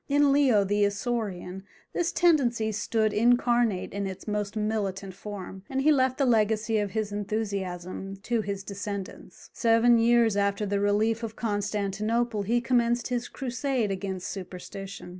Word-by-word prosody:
In 285 Hz, 0 st, +4 dB
Leo 265 Hz, -7 st, +4 dB
the 205 Hz, +1 st, +1 dB
Isaurian 200 Hz, -3 st, -2 dB, 0.3 s
this 345 Hz, -1 st, 0 dB
tendency 245 Hz, -10 st, +2 dB
stood 215 Hz, 0 st, 0 dB
incarnate 240 Hz, -3 st, +2 dB
in 200 Hz, 0 st, -2 dB
its 190 Hz, +2 st, -8 dB
most 210 Hz, 0 st, -2 dB
militant 200 Hz, -3 st, -2 dB
form, 190 Hz, -1 st, -8 dB
and 265 Hz, -, -1 dB
he 300 Hz, +3 st, +4 dB
left 260 Hz, -3 st, +2 dB
the 275 Hz, -, +2 dB
legacy 220 Hz, -1 st, +2 dB
of 205 Hz, -1 st, -1 dB
his 215 Hz, 0 st, -2 dB
enthusiasm 195 Hz, -3 st, -4 dB
to 235 Hz, 0 st, 0 dB
his 200 Hz, -2 st, -4 dB
descendants. 200 Hz, -1 st, -7 dB
Seven 230 Hz, 0 st, +4 dB
years 230 Hz, -2 st, +4 dB
after 200 Hz, +1 st, +1 dB
the 200 Hz, 0 st, 0 dB
relief 215 Hz, +3 st, +1 dB
of 225 Hz, -1 st, -5 dB
Constantinople 210 Hz, +1 st, -1 dB
he 235 Hz, +4 st, +1 dB
commenced 240 Hz, 0 st, +1 dB
his 245 Hz, -1 st, -2 dB
crusade 255 Hz, -4 st, -2 dB
against 190 Hz, -1 st, -4 dB
superstition. 190 Hz, 0 st, -7 dB
215 Hz, 145 wpm, -27 LUFS, 200-240 Hz, 0.3 s, In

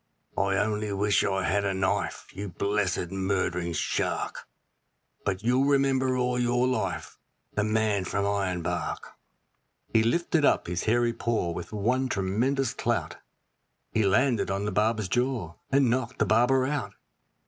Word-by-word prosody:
I 95 Hz, 0 st, +1 dB
only 105 Hz, 0 st, 0 dB
wish 100 Hz, +1 st, +2 dB
I 95 Hz, 0 st, 0 dB
had 100 Hz, +3 st, +1 dB
a 100 Hz, -1 st, 0 dB
knife, 95 Hz, 0 st, -1 dB
you 100 Hz, 0 st, -5 dB
blessed 95 Hz, -2 st, -1 dB
murdering 95 Hz, -3 st, -1 dB
shark! -, -, -2 dB, 0.8 s
But 95 Hz, 0 st, -2 dB
you'll 125 Hz, +3 st, +3 dB
remember 135 Hz, -2 st, +2 dB
all 125 Hz, 0 st, 0 dB
your 120 Hz, +1 st, +2 dB
life, 130 Hz, -, -2 dB, 0.3 s
the 105 Hz, -, +1 dB
man 110 Hz, -2 st, +1 dB
from 100 Hz, +2 st, -1 dB
Ironbark.' 90 Hz, -4 st, -2 dB, 0.8 s
He 110 Hz, -, +5 dB
lifted 165 Hz, +6 st, +1 dB
up -, -, +3 dB
his 85 Hz, 0 st, -3 dB
hairy 120 Hz, +1 st, +2 dB
paw, 115 Hz, -8 st, -1 dB
with 85 Hz, +1 st, -6 dB
one 125 Hz, +5 st, 0 dB
tremendous 120 Hz, +7 st, 0 dB
clout -, -, -2 dB, 0.7 s
He 110 Hz, -, +1 dB
landed 115 Hz, +4 st, +2 dB
on 100 Hz, +1 st, -1 dB
the 105 Hz, -, -1 dB
barber's 110 Hz, 0 st, +1 dB
jaw, 120 Hz, -5 st, -1 dB, 0.2 s
and 135 Hz, -3 st, +4 dB
knocked 130 Hz, 0 st, -1 dB
the -, -, +2 dB
barber 125 Hz, +4 st, +3 dB
out. 130 Hz, -8 st, -2 dB
105 Hz, 145 wpm, -27 LUFS, 95-125 Hz, 0.8 s, He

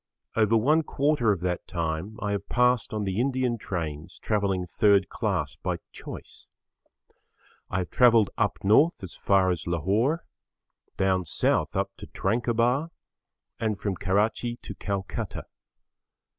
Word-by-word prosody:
Over 115 Hz, 0 st, +4 dB
one 150 Hz, +8 st, +3 dB
quarter 140 Hz, -6 st, +1 dB
of 95 Hz, -4 st, -1 dB
that 90 Hz, -1 st, -2 dB
time 85 Hz, +5 st, -3 dB
I 105 Hz, -, -1 dB
have 100 Hz, -1 st, -3 dB
passed 125 Hz, -1 st, +2 dB
on 110 Hz, -1 st, -2 dB
the 95 Hz, +1 st, -2 dB
Indian 130 Hz, -2 st, 0 dB
trains 80 Hz, -6 st, -5 dB
travelling 100 Hz, -4 st, 0 dB
third 100 Hz, +1 st, +3 dB
class -, -, -2 dB
by -, -, -2 dB
choice. -, -, -9 dB, 1.2 s
I -, -, -1 dB
have 90 Hz, -1 st, -3 dB
travelled 115 Hz, -5 st, +5 dB
up -, -, 0 dB
north 125 Hz, -, +4 dB
as 95 Hz, -, -6 dB
far 95 Hz, -2 st, +3 dB
as 85 Hz, -3 st, -4 dB
Lahore, 105 Hz, -, +1 dB, 0.7 s
down 95 Hz, -1 st, +2 dB
south 80 Hz, -, +1 dB
up -, -, 0 dB
to -, -, -10 dB
Tranquebar, 120 Hz, +7 st, 0 dB, 0.7 s
and 110 Hz, -2 st, -1 dB
from 100 Hz, -3 st, -2 dB
Karachi 105 Hz, +6 st, 0 dB
to -, -, -6 dB
Calcutta. 100 Hz, -1 st, -4 dB
105 Hz, 135 wpm, -27 LUFS, 95-120 Hz, 1.2 s, travelled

